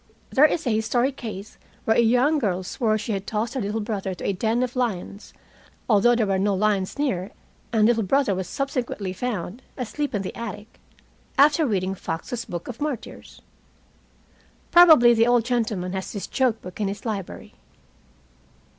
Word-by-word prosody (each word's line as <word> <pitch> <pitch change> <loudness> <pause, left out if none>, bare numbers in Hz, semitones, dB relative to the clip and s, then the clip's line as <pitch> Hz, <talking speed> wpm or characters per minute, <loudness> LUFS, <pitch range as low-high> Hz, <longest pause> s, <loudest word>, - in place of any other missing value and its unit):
There 290 +2 +6
is 315 +1 0
a 245 - +1
historic 240 +5 +1
case 210 -4 -8 0.3
where 220 - +3
a - - +3
young 250 +7 +3
girl 190 -7 -1
swore 215 +3 0
she 215 +1 -4
had 195 -1 -3
tossed 225 +2 -2
her 265 - -2
little 210 +2 -2
brother 200 -3 -3
to - - -8
a 200 - +1
den 225 +6 0
of 250 0 -4
lions 210 -5 -3 0.6
(although 235 +2 +4
there 230 -2 +1
were 195 -1 0
no 200 0 +1
lions 200 +1 0
near, 200 -10 -1 0.4
and 220 -2 +3
little 230 0 +3
brother 260 +2 +2
was 185 -1 -3
subsequently 250 -8 -3
found 210 0 -4 0.2
asleep 275 +1 -3
in 200 - -1
the 185 - -6
attic) 215 -1 -8 0.6
after 295 +2 +5
reading 190 -4 -1
Fox's 195 +7 -5
Book 175 -1 -6
of 245 0 -8
Martyrs. 290 -6 -6 1.3
Probably 315 -9 +8
the 230 0 +3
old 240 -2 +3
gentleman 215 -7 -1
has 190 -1 -4
this 200 - -4
joke 250 -4 0
book 180 +3 -8
in 205 - +1
his 200 +4 -6
library." 205 -5 -5
220 Hz, 170 wpm, -24 LUFS, 195-245 Hz, 1.3 s, Probably